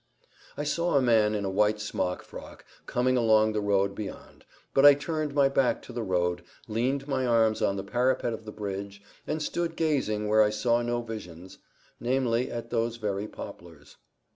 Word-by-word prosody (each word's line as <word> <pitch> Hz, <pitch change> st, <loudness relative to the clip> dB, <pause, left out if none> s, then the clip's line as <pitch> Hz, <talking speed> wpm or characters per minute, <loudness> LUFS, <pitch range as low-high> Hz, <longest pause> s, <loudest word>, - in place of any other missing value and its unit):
I 145 Hz, -, -2 dB
saw 170 Hz, +3 st, 0 dB
a -, -, +4 dB
man 110 Hz, -3 st, +3 dB
in 100 Hz, -1 st, -2 dB
a -, -, -1 dB
white 105 Hz, +2 st, +2 dB
smock 90 Hz, -3 st, -2 dB
frock -, -, -11 dB, 0.2 s
coming 130 Hz, +1 st, +1 dB
along 110 Hz, -2 st, +4 dB
the 105 Hz, -, -1 dB
road 100 Hz, -1 st, +1 dB
beyond, 100 Hz, 0 st, -9 dB, 0.3 s
but 135 Hz, -, +4 dB
I 145 Hz, -1 st, +10 dB
turned 155 Hz, 0 st, -3 dB
my 140 Hz, -1 st, +5 dB
back 135 Hz, -2 st, +1 dB
to -, -, -10 dB
the 120 Hz, -, -3 dB
road, 90 Hz, -3 st, 0 dB, 0.3 s
leaned 130 Hz, +5 st, -1 dB
my 135 Hz, -2 st, 0 dB
arms 115 Hz, -2 st, +3 dB
on 100 Hz, -, +1 dB
the 95 Hz, -, -4 dB
parapet 125 Hz, -1 st, 0 dB
of 110 Hz, -, -7 dB
the 110 Hz, -, -8 dB
bridge, 100 Hz, -1 st, -6 dB, 0.2 s
and 155 Hz, 0 st, -2 dB
stood 170 Hz, +1 st, -2 dB
gazing 130 Hz, -10 st, 0 dB
where 110 Hz, +1 st, +4 dB
I 105 Hz, -, +4 dB
saw 115 Hz, +3 st, +1 dB
no 120 Hz, 0 st, -1 dB
visions, 95 Hz, -6 st, -9 dB, 0.4 s
namely, 125 Hz, -1 st, 0 dB
at 115 Hz, 0 st, -6 dB
those 115 Hz, -1 st, 0 dB
very 105 Hz, -2 st, -3 dB
poplars. 80 Hz, -8 st, -11 dB
115 Hz, 185 wpm, -28 LUFS, 105-130 Hz, 0.4 s, I